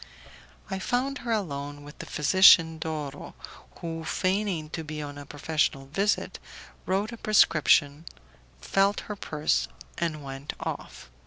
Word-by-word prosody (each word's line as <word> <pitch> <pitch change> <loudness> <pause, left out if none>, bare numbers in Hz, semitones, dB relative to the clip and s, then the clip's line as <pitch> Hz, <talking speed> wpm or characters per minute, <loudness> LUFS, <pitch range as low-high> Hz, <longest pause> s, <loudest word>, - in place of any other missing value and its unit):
I 190 - -2
found 255 +7 -1
her 235 - -4
alone 145 -8 -3
with 145 +1 -13
the - - -7
physician 160 0 +6
Doro, 150 -3 -5 0.5
who, 165 -1 -4
feigning 185 -3 -1
to 160 - -4
be 155 0 -6
on 145 -1 -6
a 145 - -10
professional 145 -2 -1
visit, 195 +10 -1 0.5
wrote 195 +4 0
a 235 - -7
prescription, 155 -7 +3 0.6
felt 195 - +2
her 210 - -6
pulse, 150 - 0 0.3
and 155 -3 -2
went 135 +1 -6
off. 65 - -6
160 Hz, 135 wpm, -27 LUFS, 145-195 Hz, 0.6 s, physician